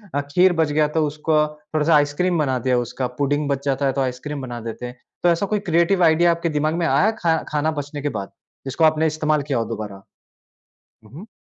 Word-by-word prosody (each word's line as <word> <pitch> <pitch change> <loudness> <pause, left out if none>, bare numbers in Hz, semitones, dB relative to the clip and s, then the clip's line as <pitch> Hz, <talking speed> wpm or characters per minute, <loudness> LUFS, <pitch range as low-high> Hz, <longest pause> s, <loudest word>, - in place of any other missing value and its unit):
अ, 145 - +1
खीर 180 +3 +4
बच 160 -3 +1
गया 150 0 +2
तो 155 - +3
उसको 155 +2 -1 0.4
थोड़ा-सा 155 +1 +3
आइसक्रीम 150 +4 +1
बना 130 -4 +1
दिया 125 +1 +1
उसका 125 +2 -3
पुडिंग 145 +1 0
बच 140 0 -1
जाता 140 0 0
है 135 - +1
तो 140 - -1
आइसक्रीम 135 +3 -4
बना 120 -2 -6
देते 115 +2 -6
हैं। 125 0 -8 0.3
तो 175 - +5
ऐसा 170 +4 +1
कोई 210 +1 -1
क्रिएटिव 170 +3 +3
आइडिया 170 +1 +4
आपके 170 0 -1
दिमाग 155 0 0
में 170 - 0
आया 215 +6 +3
खा 165 -2 +2
खाना 150 +1 0
बचने 145 +1 -8
के 145 - -1
बाद 100 - -7 0.3
जिसको 135 +5 -2
आपने 155 0 +3
इस्तेमाल 155 -1 0
किया 140 -3 -2
हो 115 - -1
दोबारा? 105 -3 -7 1.0
हुँ, 105 - -18
हुँ। 190 +9 -10
150 Hz, 220 wpm, -21 LUFS, 135-165 Hz, 1.0 s, तो